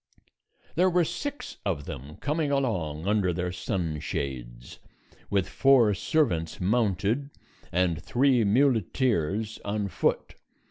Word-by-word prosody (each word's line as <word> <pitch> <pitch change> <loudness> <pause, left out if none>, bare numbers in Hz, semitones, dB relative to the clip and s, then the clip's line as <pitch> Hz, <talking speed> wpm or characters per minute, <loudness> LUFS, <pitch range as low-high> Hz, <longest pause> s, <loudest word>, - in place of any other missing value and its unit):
There 180 +4 +3
were 175 -1 +3
six 285 - -5
of 80 -8 -2
them 70 +4 -8
coming 150 +1 -1
along 90 - -1
under 100 -3 +2
their 90 +1 -2
sun 90 -3 -2
shades, - - -5 0.5
with 100 -2 +1
four 125 -1 +4
servants 95 - 0
mounted, 105 +5 +1 0.4
and 85 -2 +1
three 125 -1 +3
muleteers 110 - +1
on 100 0 -2
foot. - - 0
100 Hz, 110 wpm, -27 LUFS, 85-130 Hz, 0.5 s, four